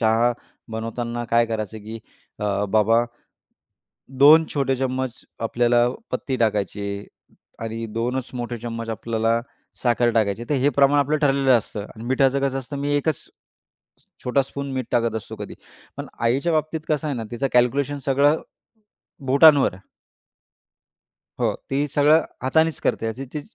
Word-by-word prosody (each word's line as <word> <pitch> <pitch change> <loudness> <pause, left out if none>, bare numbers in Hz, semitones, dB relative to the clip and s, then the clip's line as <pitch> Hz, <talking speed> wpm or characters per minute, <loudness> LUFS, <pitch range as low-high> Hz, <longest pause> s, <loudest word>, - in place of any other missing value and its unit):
चहा 115 +2 +3 0.4
बनवताना 120 +1 -4
काय 115 0 +4
करायचं 110 -1 -4
की 110 +1 -7 0.4
अ, 100 -1 0
बाबा, 110 +3 +3 1.2
2 155 +3 +8
छोटे 135 -2 +1
चम्मच 130 -1 -3 0.2
आपल्याला 120 +1 +2 0.2
पत्ती 130 +1 -2
टाकायची. 100 -1 -1 0.5
आणि 115 0 -4
2च 125 +3 -2
मोठे 120 0 -4
चमचे 115 0 -5
आपल्याला 115 +1 0 0.4
साखर 120 -1 +3
टाकायची 110 0 0
तर - - +3
हे 145 - +4
प्रमाण 140 +1 +5
आपलं 145 +2 +2
ठरलेलं 135 -1 +3
असतं. 105 - -7
आणि 110 - -10
मीठाचं 135 +2 +2
कसं 135 -1 0
असतं 135 +2 -6
मी 140 +1 -2
1च 150 -1 0 1.0
छोटा 125 +2 +2
स्पून 140 +1 -6
मीठ 130 -2 -2
टाकत 115 -2 +1
असतो 110 - -6
कधी, - - -7 0.4
पण - - -5
आईच्या 130 +8 +1
बाबतीत 155 +1 0
कसं 155 0 0
आहे 145 - -2
ना, 115 - -3
तिचं 130 +3 -1
कॅल्क्युलेशन 135 +4 +2
सगळं 145 +3 +3 0.9
बोटांवर 140 - +6
आहे. 95 - -13 1.6
हो, - - +2 0.2
ती 140 +2 +1
सगळं 150 +3 +4 0.2
हातानीच 160 +4 +2
करते. 110 0 0
ती 135 - -5
ती 150 - -2
125 Hz, 145 wpm, -23 LUFS, 115-140 Hz, 1.6 s, 2